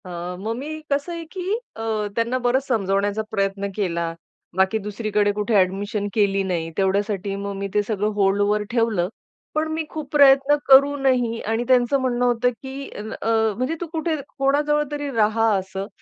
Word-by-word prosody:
अ, - - -9 0.3
मग 220 +4 -3
मी 310 +4 -5
कसं 285 +5 0
आहे 335 -1 -5
की 375 - -6 0.3
अ, 225 - -7 0.3
त्यांना 235 +2 0
बरंच 260 +3 +2
समजावण्याचा 205 -2 0
प्रयत्न 195 -1 -1
केला, 170 -5 -1 0.4
बाकी 190 +3 +3
दुसरीकडे 210 -1 0
कुठे 210 +2 -2
अ‍ॅडमिशन 200 +2 +1
केली 200 -2 +2
नाही. 170 -3 -2
तेवढ्यासाठी 195 0 0
मग 200 0 -4
मी 200 0 -3
ते 210 - +3
सगळं 210 -2 0
होल्डवर 205 +1 +2
ठेवलं. 225 -7 +1 0.5
पण 310 +1 +1
मी 320 0 -1
खूप 310 -3 -6
प्रयत्न 280 0 +6
करूनही 265 -4 +4
आणि 225 +2 -1
त्यांचं 255 +2 +3
म्हणणं 245 -1 +1
होतं, 245 0 +2
की 265 +3 -8
अन् 215 +1 -6
अ, - - -3 0.3
म्हणजे, 255 +6 -1
"तू 345 - -3
कुठे 320 0 0 0.2
कोणाजवळ 295 +2 +2
तरी 290 -1 -3
राहा" 225 +1 +3
असं, 190 +1 -5
225 Hz, 165 wpm, -22 LUFS, 200-270 Hz, 0.5 s, प्रयत्न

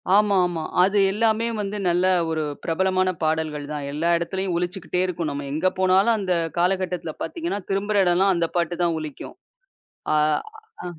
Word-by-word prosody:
ஆமா, 205 -1 +4
ஆமா. 165 -2 -4 0.2
அது 200 +2 +2
எல்லாமே, 225 +2 +1
வந்து 205 +1 -3
நல்ல 175 +1 +2 0.3
ஒரு 160 -1 -1 0.2
பிரபலமான 185 +2 +1
பாடல்கள் 155 -2 -1
தான். 145 -1 -4
எல்லா, 160 +4 -1
இடத்துலயும் 190 +2 -2
ஒளிச்சிக்கிட்டே 180 0 -2
இருக்கும். 170 -3 -3
நம்ம 140 0 -5
எங்க 165 +5 +1
போனாலும், 190 +4 +4
அந்த 185 -3 0 0.2
காலகட்டத்தில 180 -2 0
பாத்தீங்கன்னா, 335 -9 -3
திரும்புற 200 +1 +1
இடம்லாம் 185 +2 +3
அந்த 170 -1 +1
பாட்டுதான் 170 0 0
ஒலிக்கும். 155 - -8 0.8
அ - - +3 0.7
அம். 175 -3 -8
180 Hz, 150 wpm, -23 LUFS, 165-195 Hz, 0.8 s, ஆமா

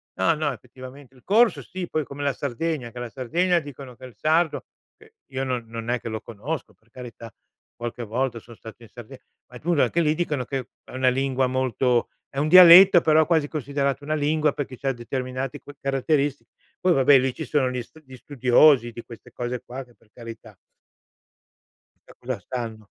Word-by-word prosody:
no, 165 - +2
no 150 -2 -1
effettivamente. 130 +3 -13
Il 125 - -20
corso 225 +3 +3
sì, 185 -1 -7
poi 155 -2 -2
come 140 +2 -7
la 140 -1 0
Sardegna, 140 0 -4
che 125 - -9
la 120 -1 -5
Sardegna 170 +9 0
dicono 140 -4 -11
che 130 - -12
il 125 -4 -13
sardo 160 +6 +1 0.3
che 445 - -21 0.2
io 130 0 -3
non 125 -3 -3
non 115 0 -7
è 125 0 0
che - - -9
lo 110 0 -4
conosco 120 +6 -6
per 110 - -35
carità, 115 -2 -11 0.4
qualche 120 +1 -6
volta 120 +2 -2
son 115 +1 -15
stato 110 +2 -13
in 115 - -15
Sarde 125 +2 -12 0.3
ma 125 - -10
comunque 165 0 +1
anche 170 +8 0
lì 155 -1 +1
dicono 150 -6 -2
che 130 -1 -4 0.2
è - - -15
una 130 0 +2
lingua 135 0 0
molto 130 -1 0 0.2
è 135 - -5
un 150 - +1
dialetto 180 +1 +9
però 155 -1 +3
quasi 160 -3 +2
considerata 140 -2 -2
una 155 +2 -2
lingua 150 0 +1
perché 130 -3 -6
c'ha 135 - -1
determinati 130 +2 -5
cu - - -13
caratteristi 140 +1 0 0.4
poi 180 -1 +3
vabbè 135 -1 +5
lì 130 0 -1
ci 160 - -5
sono 140 -4 +1
gli 125 -1 -4
stu 160 +7 -19
gli 130 -2 -13
studiosi 130 -1 +3
di 115 +1 -9
queste 120 +1 -14
cose 120 +1 -5
qua 130 +2 -8
che 120 - -23
per 115 - -30
carità 115 -3 -11 1.5
qualcosa 125 -3 -7
stanno. 115 0 -6
130 Hz, 195 wpm, -24 LUFS, 120-150 Hz, 1.5 s, dialetto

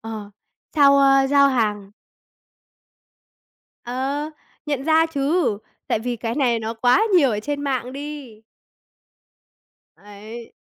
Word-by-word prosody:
ờ, 220 -2 -8 0.5
sau, 280 -1 +6
ơ, 275 0 +4
giao 280 -1 +5
hàng 210 -6 -1 1.9
Ờ, 270 +5 -3 0.4
nhận 285 -3 -2
ra 320 +1 +3
chứ, 285 - 0 0.3
tại - - +1
vì 240 +1 -4
cái 230 0 -4
này 250 -5 +1
nó 225 +1 -5
quá 245 - +3
nhiều 280 -7 +4
ở 210 -2 -2
trên 285 +5 -4
mạng 255 -2 -2
đi. 280 -6 -8 1.5
Ấy. 215 +3 -12
260 Hz, 120 wpm, -21 LUFS, 225-285 Hz, 1.9 s, sau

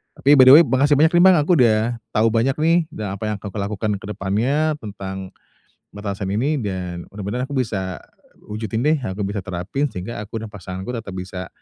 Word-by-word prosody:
Tapi 145 +2 +4
by 130 - +9
the 130 - +10
way - - +7
makasih 140 +2 +3
banyak 160 +1 +5
nih 175 - +6
Bang 190 -3 +7
aku 150 +5 +1
udah 115 0 +3 0.2
tahu 110 +2 +4
banyak 130 +4 +2
nih 165 +2 +4 0.2
dan 100 -2 -4
apa 110 - -8
yang - - -2
akan 105 - -8
aku 105 - -8
lakukan 105 +1 -2
ke - - -10
depannya 130 +12 0
tentang 95 -2 -7 0.6
batasan 100 -2 -4
ini 140 +7 0
dan 90 -4 -5
bener-bener 105 +6 -4
aku 140 - -7
bisa 95 -7 -2 0.5
wujudin 110 +2 -3
deh, 155 0 +3
aku 105 -3 -4
bisa 100 +1 -3
terapin 95 +11 -2
sehingga 95 +5 -6
aku 110 +2 -6
dan 110 - -6
pasanganku 95 +3 -6
tetap 115 -5 -6
bisa, 90 0 -6
110 Hz, 200 wpm, -21 LUFS, 95-130 Hz, 0.6 s, the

